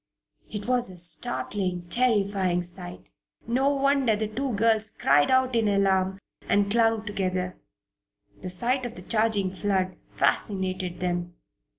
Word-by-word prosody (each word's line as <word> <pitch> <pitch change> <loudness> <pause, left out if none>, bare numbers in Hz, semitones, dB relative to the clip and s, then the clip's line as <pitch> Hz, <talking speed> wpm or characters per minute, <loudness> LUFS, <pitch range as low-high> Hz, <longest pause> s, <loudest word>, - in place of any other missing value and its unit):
It 210 0 -5
was 250 -2 +3
a 185 - -10
startling 180 0 0
a - - -21
terrifying 200 -7 +1
sight. 175 0 -9 0.3
No 260 +4 +1
wonder 275 -4 +2
the 215 +1 -2
two 255 +4 -3
girls 220 0 +3
cried 145 -6 +2
out 260 -1 +2
in 225 -2 +2
alarm 190 -1 +2 0.3
and 200 0 +2
clung 225 -1 +2
together. 185 -3 -2 0.9
The 185 - -5
sight 240 +9 -1
of 240 -1 -5
the - - -10
charging 215 -4 +1
flood 185 -2 -1 0.2
fascinated 185 -3 -1
them. 175 -1 -2
200 Hz, 135 wpm, -26 LUFS, 185-230 Hz, 0.9 s, was